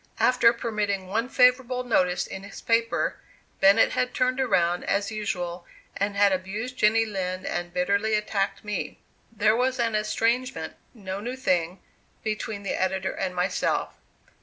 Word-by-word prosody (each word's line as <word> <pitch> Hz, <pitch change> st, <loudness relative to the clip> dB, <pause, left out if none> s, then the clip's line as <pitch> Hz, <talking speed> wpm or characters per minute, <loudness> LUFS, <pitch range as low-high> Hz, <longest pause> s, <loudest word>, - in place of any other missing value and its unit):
After 250 Hz, -2 st, +5 dB
permitting 210 Hz, -5 st, -2 dB
one 225 Hz, +6 st, -1 dB
favorable 250 Hz, 0 st, +3 dB
notice 180 Hz, -7 st, +1 dB
in 190 Hz, -, -7 dB
his 200 Hz, 0 st, -10 dB
paper, 230 Hz, 0 st, +1 dB, 0.4 s
Bennett 200 Hz, +3 st, +5 dB
had 250 Hz, -, -1 dB
turned 255 Hz, +1 st, +1 dB
around, 180 Hz, -8 st, +1 dB
as 200 Hz, +1 st, 0 dB
usual, 180 Hz, -5 st, -4 dB, 0.3 s
and 200 Hz, +1 st, -1 dB
had 200 Hz, 0 st, +4 dB
abused 200 Hz, +7 st, -3 dB
Jenny 225 Hz, -1 st, +3 dB
Lind 185 Hz, -3 st, -4 dB
and 175 Hz, 0 st, -3 dB
bitterly 200 Hz, +4 st, +1 dB
attacked 210 Hz, -2 st, -1 dB
me. 210 Hz, 0 st, -4 dB, 0.3 s
There 215 Hz, -1 st, +2 dB
was 255 Hz, +2 st, +1 dB
an 230 Hz, -2 st, 0 dB
estrangement, 230 Hz, +4 st, -1 dB, 0.2 s
no 195 Hz, -3 st, -5 dB
new 245 Hz, +5 st, -4 dB
thing, 180 Hz, -7 st, 0 dB, 0.4 s
between 215 Hz, -1 st, -3 dB
the 200 Hz, -, -2 dB
editor 190 Hz, 0 st, 0 dB
and 185 Hz, -1 st, -3 dB
myself. 180 Hz, +1 st, 0 dB
210 Hz, 145 wpm, -26 LUFS, 190-230 Hz, 0.4 s, After